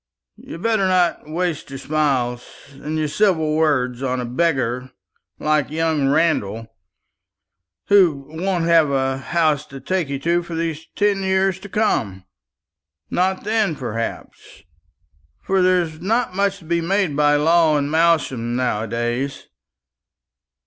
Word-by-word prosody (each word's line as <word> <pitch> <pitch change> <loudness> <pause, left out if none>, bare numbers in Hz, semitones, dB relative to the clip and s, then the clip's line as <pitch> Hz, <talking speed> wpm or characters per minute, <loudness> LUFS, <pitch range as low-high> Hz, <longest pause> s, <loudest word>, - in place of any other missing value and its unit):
You'd 165 - -10
better 220 -4 +2
not 180 -4 +1
waste 170 -2 -2
your 135 - -7
smiles 130 -5 -1 0.3
and 150 +3 -5
your 155 -1 0
civil 160 -3 +1
words 130 -6 +1
on 130 -1 -1
a 125 - -3
beggar 130 -2 -1 0.5
like 150 -2 0
young 155 -2 0
Randall, 115 -8 0 1.1
who 170 -9 +3
won't 175 +2 -2
have 165 -3 +4
a 135 -1 0
home 155 0 +1
to 140 -1 -9
take 170 +2 -2
you 140 - -2
to 170 +5 +1
for 170 -1 -7
these 165 -1 -3
ten 205 -1 +1
years 190 -1 +1
to 200 - -11
come 110 - -1 0.9
not 185 +1 0
then, 210 -5 0
perhaps 115 - -6 0.8
for 190 -1 +1
there's 175 -3 +1
not 225 +1 0
much 200 0 +1
to 175 - -17
be 170 +1 0
made 185 -2 0
by 145 0 +3
law 160 +1 +3
in 140 -1 -1
Malsham 150 -7 +1
now 120 -4 -1
a - - -8
days. 120 +4 -3
155 Hz, 140 wpm, -21 LUFS, 135-180 Hz, 1.1 s, have